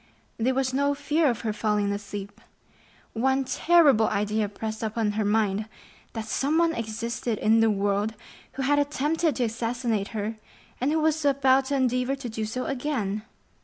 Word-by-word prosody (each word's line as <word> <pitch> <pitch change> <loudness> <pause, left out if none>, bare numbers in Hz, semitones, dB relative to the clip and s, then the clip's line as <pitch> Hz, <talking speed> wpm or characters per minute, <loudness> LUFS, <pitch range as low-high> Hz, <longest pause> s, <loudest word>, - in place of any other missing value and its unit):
There 255 +3 +1
was 260 -1 0
no 280 +1 +1
fear 295 +2 +1
of 235 - -2
her 220 -2 -2
falling 210 -1 0
asleep. 200 0 -6 0.7
One 265 +4 +1
terrible 280 -4 +4
idea 210 +1 0
pressed 215 +1 -5
upon 220 -1 -1
her 215 +1 -1
mind,—that 215 +1 -3
someone 320 +8 +1
existed 230 -1 -3
in 220 +2 +3
the 225 0 +4
world 205 +1 0 0.4
who 270 - -3
had 290 +2 +3
attempted 295 +2 0
to 250 - 0
assassinate 230 -2 -1
her, 220 0 -4 0.4
and 265 +4 +1
who 320 - +2
was 315 0 +1
about 270 -1 +3
to 280 +1 -1
endeavor 255 0 +1
to 265 -3 -6
do 220 -1 -3
so 250 +4 -3
again. 245 -7 -2
235 Hz, 160 wpm, -26 LUFS, 215-275 Hz, 0.7 s, terrible